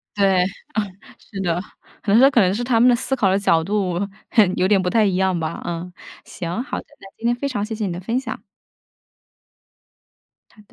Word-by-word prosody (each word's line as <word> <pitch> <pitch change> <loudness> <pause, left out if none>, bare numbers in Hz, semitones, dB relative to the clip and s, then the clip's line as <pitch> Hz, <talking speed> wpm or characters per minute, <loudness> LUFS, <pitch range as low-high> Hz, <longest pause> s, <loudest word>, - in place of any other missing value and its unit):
对， 195 -3 +3
嗯， - - -2 0.7
是 195 - -9
的。 175 -2 0 0.4
可 200 - +1
能 230 - +6
说 270 - +7
可 255 - +4
能 185 -2 +3
是 240 - -2
他 240 -2 +2
们 240 +2 +6
的 245 - +6
思 265 +2 -1
考 210 -6 +2
的 190 - +3
角 165 -5 +2
度， 190 -2 -1 0.3
很 205 -5 +4
有 185 - +2
点 205 -2 +4
不 185 - -1
太 220 +3 +3
一 195 -3 +1
样 190 -1 +1
吧， 160 +1 -4
嗯。 175 +1 -5 0.3
行， 175 +7 -4
好 280 - -4
的。 - - -8 0.2
那 - - -12
今 230 - -4
天 240 - +3
非 280 +3 -3
常 205 -6 -2
谢 220 - -5
谢 215 -1 -3
你 185 - -2
的 175 - -5
分 230 +7 -1
享。 235 -4 -6 2.1
好 - - -27
的。 - - -21
200 Hz, 240 characters per minute, -21 LUFS, 180-230 Hz, 2.1 s, 说